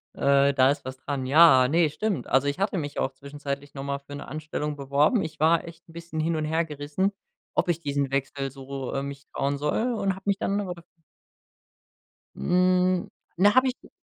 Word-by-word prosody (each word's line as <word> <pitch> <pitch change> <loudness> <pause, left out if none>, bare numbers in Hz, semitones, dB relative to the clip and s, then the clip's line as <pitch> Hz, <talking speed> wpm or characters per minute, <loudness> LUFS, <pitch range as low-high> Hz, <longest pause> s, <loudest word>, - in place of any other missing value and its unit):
Äh, 140 0 +3
da 130 0 +5
ist 145 - -4
was 130 0 -6
dran. 135 -1 -4
Ja, 135 -4 +7
ne, 165 0 +3
stimmt. 210 +4 -2
Also, 135 +2 +2
ich 145 +6 -2
hatte 195 -1 0
mich 145 -3 -4
auch 130 - -1
zwischenzeitlich 140 0 -6
noch 135 - -5
mal 140 0 -3
für 140 0 -12
'ne 145 - -8
Anstellung 150 0 -4
beworben. 145 - +2
Ich 160 - -7
war 160 +2 +4
echt 170 +1 -13
'n 165 - -16
bisschen 170 -1 -6
hin 165 +1 0
und 155 - -1
hergerissen, 160 +3 -1 0.4
ob 175 - +1
ich 170 -1 +1
diesen 140 -2 -1
Wechsel 135 0 -2
so, 135 -1 -6
äh, 135 - -1
mich 140 -1 -7
trauen 140 +1 -1
soll, 220 - 0
und 195 -3 0
habe 190 - -13
mich 200 -1 +1
dann 200 +1 0
aber 185 -3 -3
daf 170 -1 -16 1.5
Hm. 180 0 +2 0.3
Na, 205 +5 +5
habe 255 0 +5
ich 255 - -7
150 Hz, 200 wpm, -26 LUFS, 140-175 Hz, 1.5 s, Ja